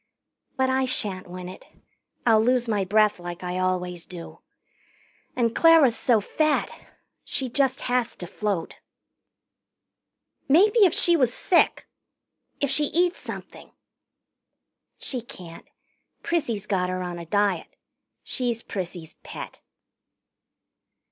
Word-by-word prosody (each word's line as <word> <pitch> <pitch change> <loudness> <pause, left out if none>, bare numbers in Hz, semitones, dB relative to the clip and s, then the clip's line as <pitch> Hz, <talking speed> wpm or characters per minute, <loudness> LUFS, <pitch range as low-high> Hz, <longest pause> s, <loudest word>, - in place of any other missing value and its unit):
"But 260 0 +2
I 260 0 +2
shan't 200 -8 -2
win 180 0 -7
it. 185 - -10 0.6
I'll 220 -2 +5
lose 245 +1 +2
my 210 -3 +1
breath 210 +1 +2
like 175 0 -7
I 180 +1 -3
always 180 -2 -1
do. 175 -2 -10 1.0
And 230 -2 0
Clara's 325 -8 +6
so 235 -4 +2
fat. 305 +8 0 0.5
She 260 -2 -1
just 270 +1 +1
has 250 -2 0
to 175 - -7
float." 195 -1 -3 1.7
"Maybe 410 - +5
if 360 - +3
she 345 - +4
was 255 -7 +2
sick 345 +8 +2 0.7
if 285 -2 0
she 295 +2 +4
eats 350 +4 +1
something - - -9 0.6
" - - -58
"She 255 -3 -2
can't. 175 -7 -12 0.6
Prissy's 240 - -1
got 185 -3 0
her 185 0 -3
on 175 -1 -5
a 170 - -8
diet. 200 -2 0 0.5
She's 240 -3 -2
Prissy's 175 -4 -6
pet." - - -9
220 Hz, 120 wpm, -25 LUFS, 185-260 Hz, 1.7 s, Clara's